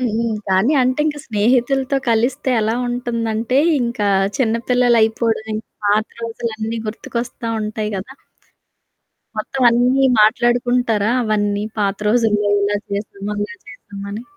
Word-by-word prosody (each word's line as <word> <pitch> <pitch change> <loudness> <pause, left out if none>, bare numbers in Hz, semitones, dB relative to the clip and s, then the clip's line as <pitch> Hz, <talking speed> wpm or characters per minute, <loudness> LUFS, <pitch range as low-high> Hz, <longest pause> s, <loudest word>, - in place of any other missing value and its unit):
హుహు. 230 -2 0 0.3
కానీ 190 +9 +3
అంటే 255 +3 +1
ఇంకా 295 -1 -2
స్నేహితులతో 255 +5 +1
కలిస్తే 250 +5 +1
ఎలా 220 +2 0
ఉంటుందంటే 235 0 -2 0.2
ఇంకా 235 -4 -1 0.3
చిన్న 235 -5 +1
పిల్లలయిపోవడం, 230 -2 +2
ఇంకా 215 +1 -6 0.2
పాత 210 +2 +2
రోజులన్నీ 230 -1 -4
గుర్తుకొస్తా 235 +2 -5
ఉంటాయి 215 0 -3
కదా! 215 +8 -7 1.2
మొత్తం 260 +5 -3
అన్నీ 250 +3 +3
మాట్లాడుకుంటారా? 240 -1 +2
అవన్నీ? 205 -2 0 0.2
పాత 200 -1 0
రోజుల్లో 210 -3 +2
ఇలా 205 0 +1
చేసాం, 200 0 -5
అలా 205 0 -3 0.2
చేశామాని? 200 0 -8
225 Hz, 115 wpm, -19 LUFS, 210-245 Hz, 1.2 s, కానీ